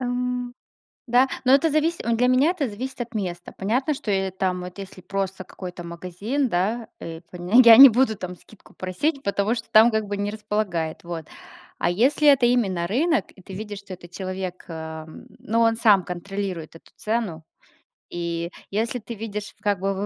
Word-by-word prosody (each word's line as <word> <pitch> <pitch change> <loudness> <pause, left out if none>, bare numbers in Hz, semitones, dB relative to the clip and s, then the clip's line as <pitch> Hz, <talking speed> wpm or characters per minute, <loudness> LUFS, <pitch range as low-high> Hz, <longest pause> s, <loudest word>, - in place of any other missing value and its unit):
Эм, 245 0 -2 0.5
да, 250 +3 +4 0.2
но 260 - +6
это 305 +4 +4
зависит, 310 -2 0
вот 230 -1 +1
для 250 +1 +3
меня 265 +6 +4
это 305 -8 -2
зависит 255 +5 -6
от 235 0 -6
места. 175 -4 -4
Понятно, 250 +9 0
что 220 -6 -4
я 190 -1 0
там 185 -1 -1
вот, 180 +2 -8
если 190 -1 -9
просто 190 0 -3
какой-то 180 -1 -9
магазин, 185 +11 -3
да, 220 +6 -1
э, 165 0 -7
панег 185 +8 +4
я 230 -1 +10
не 270 0 +12
буду 235 -1 +2
там 180 0 -6
скидку 215 - -18
просить, 270 - -2
потому 200 +3 0
что - - -7
там 225 +2 +7
как 220 -1 0
бы 205 - -3
не 205 +1 -2
располагает, 210 -7 -3
вот. 170 -2 -6 0.5
А - - +1
если 265 +11 +2
это 275 -3 +6
именно 200 -8 +1
рынок, 315 - +1
и 190 - -16
ты 190 - -11
видишь, 205 0 -6
что 200 -2 -10
этот 175 -1 -12
человек, 185 -1 -5
эм, 160 -1 -8
ну, 230 +2 0
он 225 0 +4
сам 205 -6 +5
контролирует 180 -2 -5
эту 165 - -16
цену. 215 -8 -2 0.7
И 170 0 -3 0.2
если 225 +4 -1
ты 235 +2 -7
видишь 210 -1 -6
как 205 -3 0
бы 195 +1 0
205 Hz, 185 wpm, -24 LUFS, 180-240 Hz, 0.7 s, не